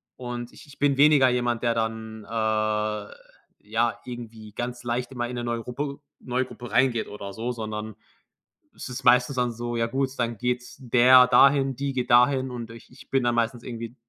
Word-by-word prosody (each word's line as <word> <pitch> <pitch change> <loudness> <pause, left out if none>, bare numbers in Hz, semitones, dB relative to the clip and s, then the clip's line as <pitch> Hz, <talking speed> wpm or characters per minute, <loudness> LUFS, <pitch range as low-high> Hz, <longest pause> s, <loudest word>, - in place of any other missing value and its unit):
Und 120 -1 -6
ich - - -15
ich 145 - -17
bin 140 -1 +2
weniger 145 -2 +6
jemand, 120 -1 0
der 115 -1 +1
dann, 110 -1 -3
äh, - - -19 1.3
ja, 115 +3 -1
irgendwie 115 -3 -9
ganz 120 +1 -5
leicht 120 +2 -2
immer 120 -2 -3
in 125 - -5
'ne 120 - -4
neue 120 -1 -2
Gruppe 140 +4 -5 0.2
neue 130 +1 -1
Gruppe 120 -3 -10
reingeht 130 -3 +2
oder 100 -1 -8
so, 115 +4 -3
sondern 110 -2 -5 0.8
es - - -8
ist 125 +1 -7
meistens 125 +2 +4
dann 120 -1 0
so: 120 +1 -4
Ja 115 0 +1
gut, 135 +2 -1
dann 115 -2 -1
geht's 125 +1 -3
der 125 +1 +6
dahin, 135 0 +5
die 140 -1 -2
geht 125 -2 -2
dahin 130 +1 +4
und 120 -2 -6
ich 115 0 -13
ich - - -16
bin 135 -2 +1
dann 120 -1 +1
meistens 115 0 -1
irgendwie 115 0 -7
120 Hz, 190 wpm, -25 LUFS, 115-130 Hz, 1.3 s, weniger